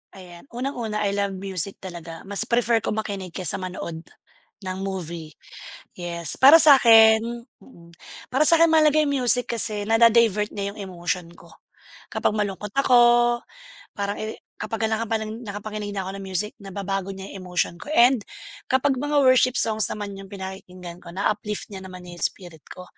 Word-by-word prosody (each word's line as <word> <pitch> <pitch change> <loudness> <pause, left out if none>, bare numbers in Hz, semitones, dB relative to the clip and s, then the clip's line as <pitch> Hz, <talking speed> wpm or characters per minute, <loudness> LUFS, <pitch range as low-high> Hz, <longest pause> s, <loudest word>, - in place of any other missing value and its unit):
Ayan, 180 +3 -14
unang-una, 235 -5 -3
I 200 - 0
love 200 -1 -2
music 195 0 -4
talaga, 170 -3 -9
mas 200 +4 +1
prefer 235 -1 +2
ko 210 - -3
makinig 200 -5 -5
kesa 185 0 0
manood 170 -3 -7 0.6
ng 185 0 -5
movie, 170 -5 -6 0.6
yes. 170 -2 -2
Para 285 +5 +8
sa'kin 225 -7 +7 0.4
mm, 170 -9 -18 0.4
para 265 +4 +1
sa'kin 335 +1 +5
mahalaga 310 -1 +4
'yung 280 -3 0
music 245 0 +4
kasi 210 -2 0
nada-divert 225 -2 +3
niya 200 0 -5
'yung - - -15
emotion 175 -1 -4
ko - - -18 0.6
kapag - - -1
malungkot 205 0 -4
ako, 240 -2 +4 0.6
parang 200 -1 -3
eri 215 0 -5 0.2
kapag 220 +1 -3
nakapa 220 0 -2
nakapakinig 210 -2 -7
na 195 - -3
ako 195 +1 -7
ng - - -8
music 190 +3 -2
nababago 195 0 -5
niya 190 0 -9
'yung 185 -2 -10
emotion 180 -1 -2
ko, - - -12
and 240 -2 +4 0.4
kapag 260 0 +1
mga 290 0 +1
worship 255 0 +4
songs 220 -4 +4
naman 200 -2 -6
'yung 195 - -11
pinakikinggan 185 -2 -9
ko 170 0 -13
na-uplift 210 +1 -3
niya 190 - -7
naman 185 -1 -11
'yung 175 -1 -11
spirit 175 -5 -1
ko. 180 - -11
205 Hz, 160 wpm, -23 LUFS, 185-230 Hz, 0.6 s, Para